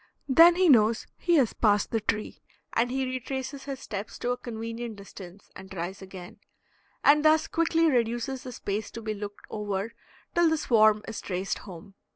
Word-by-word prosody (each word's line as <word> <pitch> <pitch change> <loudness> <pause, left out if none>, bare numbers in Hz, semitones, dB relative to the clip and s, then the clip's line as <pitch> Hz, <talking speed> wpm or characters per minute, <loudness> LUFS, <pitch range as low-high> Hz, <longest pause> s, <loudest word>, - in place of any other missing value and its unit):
Then 330 +5 +7
he 370 0 +3
knows 225 -5 +4
he 345 -1 +2
has 265 -8 +3
passed 205 -2 +2
the 225 - +1
tree, 215 0 -3 0.3
and 235 +2 +1
he 265 +1 -1
retraces 265 +2 -5
his 275 -2 -5
steps 205 0 -6
to 245 - -2
a 245 - -1
convenient 230 -1 -6
distance 195 -1 -12
and 190 - -11
tries 190 +1 -5
again, 190 -2 -10 0.6
and 295 +1 +5
thus 310 0 +4
quickly 330 0 +1
reduces 240 0 0
the 255 - -8
space 210 -2 -4
to 230 - -7
be 215 0 -2
looked 205 0 -8
over 210 +1 -3 0.4
till 345 -1 +4
the 320 - +1
swarm 215 -6 +4
is 225 - -5
traced 185 0 -3
home. 180 +2 -11
230 Hz, 180 wpm, -27 LUFS, 205-270 Hz, 0.6 s, Then